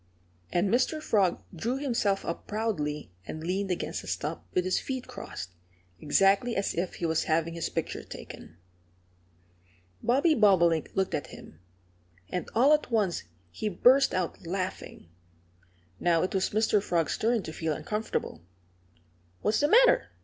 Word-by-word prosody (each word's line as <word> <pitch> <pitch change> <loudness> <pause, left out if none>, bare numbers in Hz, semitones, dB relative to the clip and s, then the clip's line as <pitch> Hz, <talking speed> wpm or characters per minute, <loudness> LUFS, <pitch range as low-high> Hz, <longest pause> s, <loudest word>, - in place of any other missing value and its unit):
And 175 +3 +2
Mr. 255 +7 +1
Frog 200 - +1
drew 235 +10 -2
himself 230 -8 0
up 170 - -5
proudly 150 - -2 0.2
and 155 - -6
leaned 190 +3 -1
against 180 - -3
a - - -11
stump, 85 - -3
with 180 - 0
his 185 - +1
feet 260 -2 -4
crossed, 90 - -8 0.5
exactly 195 +9 +3
as 195 - 0
if 175 +2 -2
he 170 - -3
was 160 -1 +1
having 165 +1 +1
his 165 -1 -3
picture - - -3
taken. 80 - -11 1.4
Bobby 280 +7 +3
Bobolink 180 - +4
looked 190 -1 0
at - - -2
him. 80 - -13 0.7
And 180 - -3
all 265 +6 +6
at 300 -3 +1
once 210 - 0 0.3
he 210 - -3
burst 255 +8 +5
out 185 -2 -2
laughing. 185 - -4 0.9
Now 170 -2 +2
it 185 - -2
was 190 -1 +1
Mr. 215 -1 +2
Frog's 170 -5 0
turn 230 -1 +1
to 160 - -7
feel 160 -1 -1
uncomfortable. 210 - -3 1.0
"What's 210 - +2
the 290 - +3
matter?" - - +5
195 Hz, 150 wpm, -28 LUFS, 170-230 Hz, 1.4 s, all